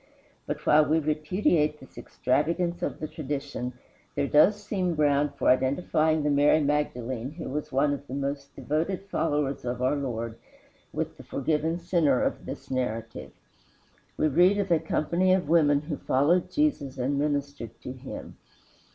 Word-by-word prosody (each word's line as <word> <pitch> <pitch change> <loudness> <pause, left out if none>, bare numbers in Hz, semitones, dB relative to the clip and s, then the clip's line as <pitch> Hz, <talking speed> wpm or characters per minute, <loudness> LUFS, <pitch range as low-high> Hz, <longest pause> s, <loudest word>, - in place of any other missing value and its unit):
But 150 0 -4
while 155 +1 +6
we 150 +2 +2
repudiate 155 0 +1
this 130 - -16
extravagance 165 +9 -1
of - - -3
the 155 - -3
tradition, 140 -4 -4 0.4
there 140 - +1
does 155 +9 +5
seem 200 -4 -2
ground 145 -1 +2
for - - 0
identifying 155 +4 +2
the 150 - +1
Mary 145 +2 +4
Magdalene 130 -4 -1
who 160 - -7
was 150 +2 -4
one 140 +2 +2
of 140 0 -7
the 130 - -5
most 140 0 -4
devoted 165 +6 -1
followers 145 -6 -1
of 125 0 -3
our 130 +3 +1
Lord 115 -5 -4 0.5
with - - -4
the - - -11
forgiven 155 +4 -1
sinner 170 -6 +2
of - - -2
this - - -8
narrative. 115 -3 -3 0.9
We 155 - +2
read 180 +7 +4
of 200 -3 -1
a 165 - +5
company 170 +4 +1
of 180 -6 -2
women 145 -3 +4
who 150 -1 -5
followed 155 +7 +2
Jesus 275 - 0
and 135 +3 0
ministered 140 -5 -3
to - - -6
him. 130 +1 -9
150 Hz, 160 wpm, -27 LUFS, 135-160 Hz, 0.9 s, while